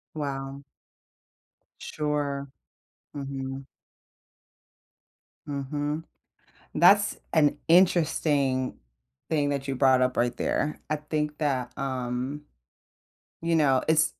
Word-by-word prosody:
Wow. 140 -2 -4 1.2
Sure. 145 -2 -2 0.7
Mhm. 135 -1 -5 1.8
Mhm. 145 +2 -3 0.7
That's 200 +6 +5 0.2
an 150 -2 +4
interesting 150 -7 +3 0.5
thing 145 -2 +1
that 140 -1 -2
you 135 - -1
brought 130 -1 +4
up 125 0 +1
right 120 0 +1
there. 150 - -1
I 155 - +1
think 150 0 -3
that, 130 -5 -1
um, 130 +2 -3 1.0
you 165 0 +1
know, 135 -4 +4
it's, 160 0 +3
145 Hz, 90 wpm, -27 LUFS, 135-150 Hz, 1.8 s, That's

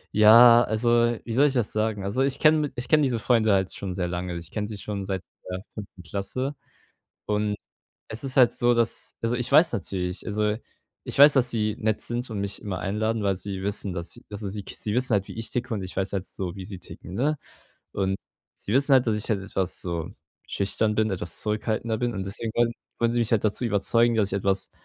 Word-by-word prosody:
Ja, 115 +3 +8
also, 120 +1 +2
wie 115 - -5
soll 140 +4 +5
ich 140 - -1
das 120 -5 0
sagen? 110 -2 -1
Also, 100 +7 -1
ich 135 0 +1
kenne 155 -1 +3
ich 120 - -5
kenne 155 -1 +5
diese 125 -4 +1
Freunde 110 -3 +3
halt 95 -1 +1
schon 95 -2 -5
sehr 90 -2 -2
lange. 90 0 -3
Also, 85 - -4
ich 85 - -11
kenne 105 -1 -3
sie 105 -2 -6
schon 100 -1 -5
seit 95 -2 -3 0.3
der 90 +1 -4
5. 100 -4 -10
Klasse. 125 - -3 0.7
Und 105 0 0 0.5
es 110 +5 -3
ist 135 0 -3
halt 125 -3 +7
so, 120 0 +2
dass 115 -1 0
also, 115 +2 0
ich 125 +2 -2
weiß 155 +1 +6
natürlich 90 -3 -3
also, 105 0 0 0.5
ich - - -5
weiß, 145 +1 +9
dass 125 -2 +4
sie 110 -1 -1
nett 110 -1 0
sind 120 +1 -2
und 105 -2 -3
mich 100 0 -3
immer 95 -3 -4
einladen, 110 +2 -1
weil 100 -2 +1
sie 95 0 -5
wissen, 100 -1 -2
dass 85 -1 -6
also 105 -1 -5
sie 100 0 -5
sie 105 0 -3
wissen 130 0 +1
halt, 100 -1 +1
wie - - -8
ich 115 - -3
ticke 125 -1 -3
und 100 - -3
ich 90 - -7
weiß 95 0 -1
halt 95 -2 -2
so, 90 -1 -5
wie 95 - -7
sie 95 -3 -7
ticken, 90 - -10
ne? 145 +6 0 0.5
Und 95 0 -1 0.4
sie 100 - -2
wissen 140 +2 +3
halt, 125 -2 +4
dass 110 -1 +1
ich 105 - -2
halt 100 -3 0
etwas 95 -1 -2
so 85 0 -4 0.4
schüchtern 105 +2 0
bin, 110 -1 +2
etwas 85 -3 -2
zurückhaltender 110 +1 -1
bin 120 -2 -1
und 95 -1 -3
deswegen 110 +3 -4
wollen 120 0 +2 0.3
wollen 115 0 +2
sie 120 - +1
mich 115 0 0
halt 110 -1 +2
dazu 105 +4 0
überzeugen, 115 +2 +2
dass 100 -3 +2
ich 100 - +1
etwas 95 0 -1
105 Hz, 230 wpm, -25 LUFS, 95-120 Hz, 0.7 s, weiß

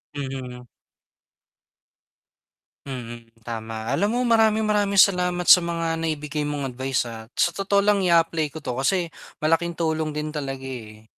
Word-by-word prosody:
Mhm. 130 -3 -6 2.2
Mm, 120 -3 -7 0.2
tama. 110 +1 -4
alam 200 +9 +1
mo 245 +2 0
maraming 220 -2 +3
maraming 205 -1 +1
salamat 180 -2 +4
sa 180 - +8
mga 165 -1 -2
naibigay 150 -1 -2
mong 140 -3 -3
advice, 130 0 -1
ah, 115 -1 -9
sa 175 - +2
totoo 195 +2 0
lang 205 -1 +3
i-apply 165 -3 +2
ko 150 - -10
to 135 -5 -4
kasi 155 +8 +1 0.3
malaking 165 +2 0
tulong 160 -2 0
din 150 0 -4
talaga 135 -3 -5
eh. 110 -4 -9
155 Hz, 140 wpm, -24 LUFS, 130-180 Hz, 2.2 s, sa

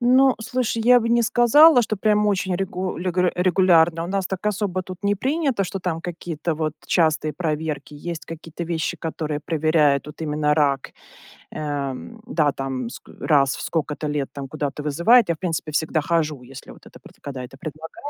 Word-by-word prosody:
Ну, 255 +2 +5
слушай, 230 0 -1
я 250 0 +8
бы 230 - -2
не 235 0 +3
сказала, 245 +5 +6
что 215 -1 -2
прям 210 +1 +2
очень 190 -3 0
регу 185 -2 -3
легуре 180 0 0
регулярно. 175 -2 +3
У - - -4
нас 195 0 -1
так 190 +2 -5
особо 195 -3 -1
тут 185 +1 -10
не 200 0 +3
принято, 265 - 0
что 195 - -4
там 175 -3 -3
какие-то 170 -1 -4
вот 155 -1 -2
частые 155 -3 +2
проверки. 155 -2 -3
Есть 165 +2 -6
какие 165 0 -9
то 170 - -4
вещи, 165 -1 -2
которые 155 -2 -4
проверяют 155 -3 +2
вот 150 +2 -11
именно 150 -1 +1
рак. 140 -3 +1 0.6
Э, 145 -3 -3 0.3
да, 155 - +2
там 130 -3 -4
ск - - -12
раз 140 -3 +3
в - - -8
сколько-то 150 -1 -2
лет, 145 -2 -2
там 140 -1 -6
куда-то 145 0 -4
вызывает. 170 - +4
Я 170 - +2
в - - -27
принципе 165 -4 -3
всегда 155 +1 0
хожу, 155 -3 -1
если 135 +2 -11
вот - - -16
это - - -14
пр - - -16
когда 135 -3 -6
это 135 +2 -11
предлагается. 160 - -8
165 Hz, 190 wpm, -22 LUFS, 150-195 Hz, 0.6 s, я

